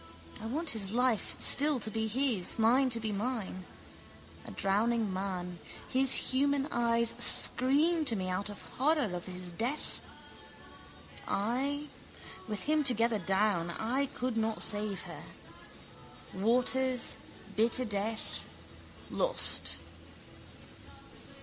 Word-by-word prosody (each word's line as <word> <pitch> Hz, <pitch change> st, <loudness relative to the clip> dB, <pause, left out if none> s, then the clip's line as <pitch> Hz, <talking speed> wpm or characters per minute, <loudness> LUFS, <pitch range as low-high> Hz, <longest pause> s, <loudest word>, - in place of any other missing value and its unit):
I 220 Hz, -, -6 dB
want 310 Hz, +6 st, +1 dB
his 210 Hz, -4 st, +5 dB
life 240 Hz, 0 st, 0 dB
still 290 Hz, -1 st, +3 dB
to 220 Hz, -1 st, -3 dB
be 220 Hz, +1 st, -2 dB
his, 230 Hz, -5 st, +1 dB
mine 250 Hz, +4 st, +3 dB
to 235 Hz, -2 st, +3 dB
be 220 Hz, -1 st, -4 dB
mine. 205 Hz, -3 st, -4 dB, 0.8 s
A -, -, -7 dB
drowning 210 Hz, +1 st, -1 dB
man. 180 Hz, -2 st, -5 dB, 0.3 s
His 260 Hz, 0 st, +5 dB
human 280 Hz, +1 st, +2 dB
eyes 235 Hz, -1 st, +1 dB
scream 310 Hz, +6 st, +4 dB
to 230 Hz, -, +3 dB
me 185 Hz, -2 st, -3 dB
out 185 Hz, +3 st, -2 dB
of 205 Hz, -, -9 dB, 0.2 s
horror 285 Hz, -, +1 dB
of 175 Hz, -, -7 dB
his 180 Hz, -1 st, -5 dB
death. 240 Hz, -, -4 dB, 1.3 s
I... 265 Hz, +8 st, -2 dB, 0.6 s
With 210 Hz, -3 st, -4 dB
him 305 Hz, 0 st, +1 dB
together 230 Hz, -4 st, +2 dB
down... 190 Hz, -2 st, 0 dB
I 245 Hz, +10 st, -2 dB
could 250 Hz, -2 st, -4 dB
not 220 Hz, 0 st, -1 dB
save 205 Hz, -2 st, -1 dB
her. -, -, -9 dB, 1.1 s
Waters: 250 Hz, +5 st, +1 dB, 0.4 s
bitter 235 Hz, +3 st, +1 dB
death: 215 Hz, +1 st, -4 dB, 0.7 s
lost. -, -, +1 dB
230 Hz, 115 wpm, -30 LUFS, 205-260 Hz, 1.3 s, his